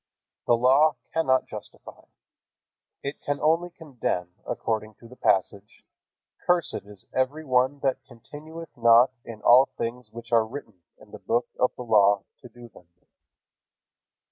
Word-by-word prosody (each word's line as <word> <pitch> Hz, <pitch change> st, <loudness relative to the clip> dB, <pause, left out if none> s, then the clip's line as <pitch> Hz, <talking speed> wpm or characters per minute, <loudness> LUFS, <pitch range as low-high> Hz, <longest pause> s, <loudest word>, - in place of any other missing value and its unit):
The 120 Hz, -, +4 dB
Law 135 Hz, +6 st, +4 dB, 0.2 s
cannot 130 Hz, -5 st, +2 dB
justify. -, -, -11 dB, 1.0 s
It 140 Hz, +1 st, -5 dB
can 145 Hz, 0 st, -2 dB
only 165 Hz, +3 st, +2 dB
condemn 130 Hz, -, -4 dB, 0.2 s
according 110 Hz, -1 st, -3 dB
to 115 Hz, -, -16 dB
the 125 Hz, -, -14 dB
passage: 100 Hz, -1 st, -1 dB, 0.6 s
"Cursed 175 Hz, -2 st, +1 dB
is 105 Hz, -2 st, -13 dB
every 140 Hz, +5 st, -1 dB
one 130 Hz, +1 st, +1 dB
that 135 Hz, -1 st, -1 dB
continueth 155 Hz, +7 st, -11 dB
not 120 Hz, +2 st, +5 dB
in 110 Hz, -2 st, -10 dB
all 130 Hz, +3 st, +7 dB
things 115 Hz, 0 st, -5 dB
which 115 Hz, +2 st, -11 dB
are 115 Hz, -1 st, +5 dB
written 110 Hz, -7 st, -10 dB, 0.2 s
in -, -, -18 dB
the -, -, -10 dB
book 120 Hz, +1 st, 0 dB
of 125 Hz, -, +1 dB
the 125 Hz, -, -7 dB
law 100 Hz, -3 st, +4 dB, 0.2 s
to 125 Hz, -, -13 dB
do 120 Hz, +1 st, -13 dB
them." 90 Hz, -6 st, -19 dB
125 Hz, 140 wpm, -25 LUFS, 115-145 Hz, 1.0 s, all